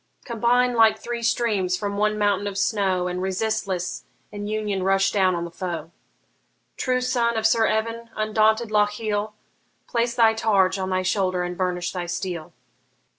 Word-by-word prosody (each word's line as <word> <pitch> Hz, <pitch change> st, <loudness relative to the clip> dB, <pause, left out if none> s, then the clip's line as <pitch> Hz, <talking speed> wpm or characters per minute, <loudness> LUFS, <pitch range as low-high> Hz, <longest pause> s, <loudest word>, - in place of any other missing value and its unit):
Combine 245 Hz, +1 st, +2 dB
like 225 Hz, -2 st, +5 dB
three 240 Hz, 0 st, -5 dB
streams 220 Hz, -6 st, +1 dB
from 200 Hz, 0 st, -3 dB
one 210 Hz, +1 st, +1 dB
mountain 205 Hz, -1 st, +1 dB
of 200 Hz, -1 st, -4 dB
snow, 195 Hz, -3 st, +1 dB
And 180 Hz, 0 st, -3 dB
resistless 190 Hz, -1 st, -2 dB, 0.3 s
in 205 Hz, 0 st, -6 dB
union 210 Hz, -2 st, -2 dB
rush 195 Hz, +1 st, +2 dB
down 190 Hz, -3 st, +2 dB
on 170 Hz, 0 st, -3 dB
the 170 Hz, -, -8 dB
foe! 170 Hz, -2 st, -5 dB, 0.8 s
True 255 Hz, -1 st, 0 dB
son 235 Hz, -2 st, +1 dB
of 220 Hz, -, -1 dB
Sir 225 Hz, 0 st, +4 dB
Evan, 230 Hz, +1 st, -2 dB
undaunted 215 Hz, +1 st, +2 dB
Lochiel, 210 Hz, 0 st, 0 dB, 0.5 s
Place 235 Hz, 0 st, -1 dB
thy 225 Hz, -2 st, +5 dB
targe 200 Hz, -4 st, +2 dB
on 190 Hz, 0 st, -2 dB
thy 185 Hz, 0 st, 0 dB
shoulder 185 Hz, -2 st, 0 dB
and 180 Hz, 0 st, -4 dB
burnish 180 Hz, -1 st, -2 dB
thy 180 Hz, -2 st, -4 dB
steel! 175 Hz, -2 st, -4 dB
205 Hz, 160 wpm, -24 LUFS, 185-225 Hz, 0.8 s, like